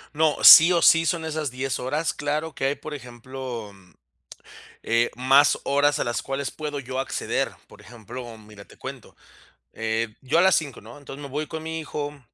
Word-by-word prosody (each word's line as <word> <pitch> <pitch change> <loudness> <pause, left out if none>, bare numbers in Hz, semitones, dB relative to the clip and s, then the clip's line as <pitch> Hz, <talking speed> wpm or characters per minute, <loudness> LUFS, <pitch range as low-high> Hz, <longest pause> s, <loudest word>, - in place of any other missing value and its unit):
No, 155 -1 +2
sí 165 +3 +11
o 170 -1 +2
sí, 165 0 +5
son 165 -1 -1
esas 155 -3 -3
10 130 -2 -3
horas. 150 +5 -2
Claro 150 +1 -3
que - - -6
hay, 140 - -1
por 155 - -9
ejemplo, 125 -3 -8 1.1
eh, 115 +1 +1
más 135 +3 +4
horas 145 +1 +2
a - - -1
las 120 -2 -2
cuales 135 0 -4
puedo 150 -2 -5
yo 130 0 -6
acceder. 135 - -2 0.2
Por - - -17
ejemplo, 120 0 -10
mira, 105 -2 -15
te - - -18
cuento. - - -10 0.6
Eh, 110 0 -3
yo 135 +4 -1
a - - +5
las 190 0 +5
5 145 -5 -4
¿no? 115 +5 -13
Entonces, 140 0 -10
me 140 - -7
voy 150 +3 -4
con 160 +1 -7
mi 160 0 -5
hijo, 150 -2 -6
140 Hz, 190 wpm, -24 LUFS, 120-155 Hz, 1.1 s, sí